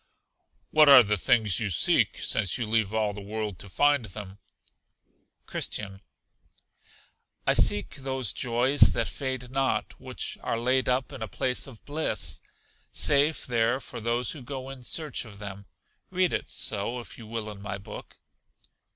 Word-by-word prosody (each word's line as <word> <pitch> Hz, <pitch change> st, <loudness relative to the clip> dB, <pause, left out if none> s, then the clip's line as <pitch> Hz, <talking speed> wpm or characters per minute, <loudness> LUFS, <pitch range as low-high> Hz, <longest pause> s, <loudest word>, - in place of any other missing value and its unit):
What 155 Hz, -1 st, +6 dB
are 135 Hz, -3 st, +10 dB
the 105 Hz, -1 st, +1 dB
things 105 Hz, 0 st, +2 dB
you 110 Hz, -, -1 dB
seek, 85 Hz, -, +4 dB
since 100 Hz, -5 st, +1 dB
you 120 Hz, -, -2 dB
leave 110 Hz, -2 st, +1 dB
all 110 Hz, -2 st, 0 dB
the 105 Hz, -, -8 dB
world 105 Hz, -1 st, -5 dB
to 100 Hz, -, -10 dB
find 145 Hz, +3 st, +3 dB
them? 100 Hz, -1 st, -9 dB, 1.1 s
Christian. 95 Hz, -2 st, -4 dB, 1.4 s
I -, -, +4 dB
seek 105 Hz, -, +4 dB
those 130 Hz, -5 st, -2 dB
joys 125 Hz, +3 st, 0 dB
that -, -, -1 dB
fade 130 Hz, -2 st, -4 dB
not, 135 Hz, 0 st, 0 dB
which -, -, -4 dB
are 115 Hz, -, -2 dB
laid 130 Hz, +2 st, +1 dB
up 125 Hz, +1 st, 0 dB
in 130 Hz, -, -9 dB
a 110 Hz, -, -3 dB
place 125 Hz, +6 st, -1 dB
of 120 Hz, -5 st, -14 dB
bliss 110 Hz, -, -2 dB, 0.5 s
safe 145 Hz, +2 st, +3 dB
there 120 Hz, +1 st, +1 dB
for 125 Hz, -, -8 dB
those 120 Hz, +2 st, 0 dB
who 150 Hz, -, -7 dB
go 130 Hz, +1 st, -6 dB
in 135 Hz, -2 st, -10 dB
search 150 Hz, +3 st, -2 dB
of 105 Hz, -4 st, -12 dB
them. 100 Hz, -1 st, -8 dB, 0.4 s
Read 185 Hz, -1 st, +1 dB
it -, -, -2 dB
so, 110 Hz, +4 st, -3 dB
if 120 Hz, -, -11 dB
you 115 Hz, -, -11 dB
will, 110 Hz, -1 st, -4 dB
in 100 Hz, -1 st, -11 dB
my 100 Hz, 0 st, -5 dB
book. 100 Hz, -, -11 dB
115 Hz, 160 wpm, -27 LUFS, 105-130 Hz, 1.4 s, are